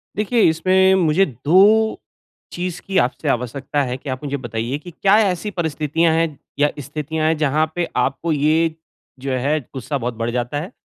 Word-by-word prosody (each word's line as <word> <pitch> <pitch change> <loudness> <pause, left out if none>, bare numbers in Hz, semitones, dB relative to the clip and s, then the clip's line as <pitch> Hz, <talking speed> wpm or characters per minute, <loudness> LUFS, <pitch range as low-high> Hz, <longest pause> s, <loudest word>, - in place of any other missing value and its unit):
देखिए 215 +3 +1
इसमें 190 +3 +3
मुझे 180 +1 +3
2 190 - +3 0.5
चीज़ 180 0 -4
की 195 -1 -3
आपसे 125 +1 0
आवश्यकता 130 +4 -1
है 125 0 -3
कि 140 - -9
आप 130 +3 -4
मुझे 140 0 -2
बताईए 120 +2 -3
की 175 +3 -11
क्या 195 +5 +3
ऐसी 200 0 0
परिस्थितियाँ 160 -1 0
है 165 0 +2 0.3
या 145 0 +4
स्थितियाँ 155 +3 -3
हैं 160 -1 +2
जहाँ 155 +1 +2
पे 175 -1 -1 0.2
आपको 160 +5 -2
ये 155 +2 +2 0.4
जो 135 0 -4
है, 140 +5 0
ग़ुस्सा 135 +2 -5
बहुत 120 -1 -3
बढ़ 115 +1 -2
जाता 125 +4 -2
है? 180 +9 -7
155 Hz, 175 wpm, -20 LUFS, 135-175 Hz, 0.5 s, या